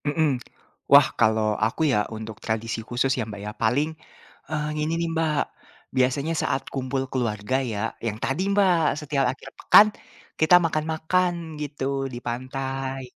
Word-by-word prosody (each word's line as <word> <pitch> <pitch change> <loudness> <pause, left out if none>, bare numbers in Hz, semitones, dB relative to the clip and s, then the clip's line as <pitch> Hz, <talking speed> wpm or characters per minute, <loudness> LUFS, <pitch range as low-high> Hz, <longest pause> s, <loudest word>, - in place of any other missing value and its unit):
Mhm. 145 -4 +1 0.5
Wah, - - +9
kalau 110 -1 +3
aku 115 +7 -2
ya, 105 - +3 0.2
untuk 110 0 -7
tradisi 115 +1 -2
khusus 125 +2 +1
ya 125 - 0
Mbak 105 -1 -7
ya. 105 - -4
Paling, 130 +7 +2 0.6
eh, 150 -1 -2
ini 155 +2 -1
nih 170 0 -1
Mbak. 160 -2 +1 0.6
Biasanya 140 +5 +1
saat 135 - -1
kumpul 130 0 -2
keluarga 115 -2 -1
ya, 115 -3 -3
yang 110 -2 -2
tadi 135 +7 -1
Mbak, 180 -7 +3
setiap 140 -2 0
akhir 135 0 -11
pekan 215 - +8 0.5
kita 155 +3 +6
makan-makan 160 +3 0 0.3
gitu 145 -2 -4 0.3
di 120 - -5
pantai. 135 +2 -4
135 Hz, 145 wpm, -24 LUFS, 115-155 Hz, 0.6 s, Wah